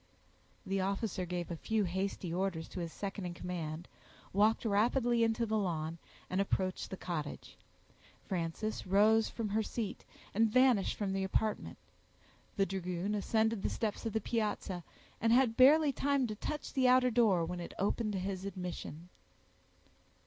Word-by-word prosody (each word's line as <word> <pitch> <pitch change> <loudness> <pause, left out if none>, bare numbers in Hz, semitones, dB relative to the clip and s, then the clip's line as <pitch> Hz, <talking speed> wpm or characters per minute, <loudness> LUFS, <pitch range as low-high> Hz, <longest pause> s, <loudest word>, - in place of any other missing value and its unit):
The 195 0 0
officer 195 -1 -1
gave 175 0 -3
a - - -2
few 220 +6 0
hasty 190 -1 -2
orders 175 -3 -1
to - - -6
his 170 -2 -4
second 195 -1 -4
in 175 - -6
command, 170 -2 -5 0.5
walked 215 +4 +3
rapidly 235 +3 +3
into 225 +1 +1
the 220 -1 0
lawn, 165 -4 -2 0.3
and 185 +2 0
approached 185 -1 -1
the 190 - -5
cottage. 160 -6 -5 0.7
Frances 185 +4 -3
rose 215 +4 +4
from 225 -3 -3
her 215 +2 +1
seat, 220 -1 -4 0.3
and 225 +2 +3
vanished 250 -3 +4
from 200 -2 -1
the 195 0 0
apartment. 210 +3 -1 0.8
The 195 - +4
dragoon 185 +1 -2
ascended 220 +1 +1
the - - 0
steps 215 -3 -2
of 220 - -4
the 220 - 0
piazza, 210 -5 -2 0.4
and 225 - +3
had 240 -2 +4
barely 290 +4 +7
time 280 0 +1
to 215 -3 -4
touch 300 +7 -5
the 260 -2 +3
outer 250 0 +5
door, 215 -8 +4
when 180 +1 -4
it 170 - -7
opened 210 +2 0
to 190 - -1
his 190 0 -3
admission. 180 -4 -6
200 Hz, 160 wpm, -33 LUFS, 180-225 Hz, 0.8 s, barely